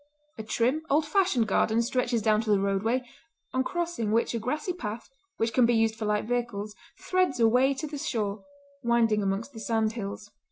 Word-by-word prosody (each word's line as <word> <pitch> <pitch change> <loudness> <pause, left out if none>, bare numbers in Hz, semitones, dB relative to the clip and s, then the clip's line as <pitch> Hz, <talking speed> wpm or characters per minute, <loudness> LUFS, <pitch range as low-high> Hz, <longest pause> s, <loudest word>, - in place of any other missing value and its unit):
A - - -1
trim 235 +7 0
old 300 +3 +3
fashioned 300 - +2
garden 220 +3 +2
stretches 240 -2 0
down 215 -1 +3
to 225 - -5
the 205 -2 +4
roadway, 200 +6 0 0.5
on 260 0 +1
crossing 340 - -2
which 230 +2 +1
a 230 - -1
grassy 300 - -2
path, 225 -9 -6 0.3
which 225 0 0
can 250 -2 +5
be 240 - +3
used 225 0 +3
for 220 -1 -4
light 210 0 0
vehicles, 235 -3 -2 0.2
threads 365 -9 0
a 230 - +6
way 260 +4 +3
to 310 - -4
the 295 -1 -6
shore, 210 -6 -2 0.4
winding 235 -3 +2
amongst 200 +7 -2
the 225 - -8
sand 220 -1 0
hills. 215 -1 -6
230 Hz, 195 wpm, -27 LUFS, 215-260 Hz, 0.5 s, a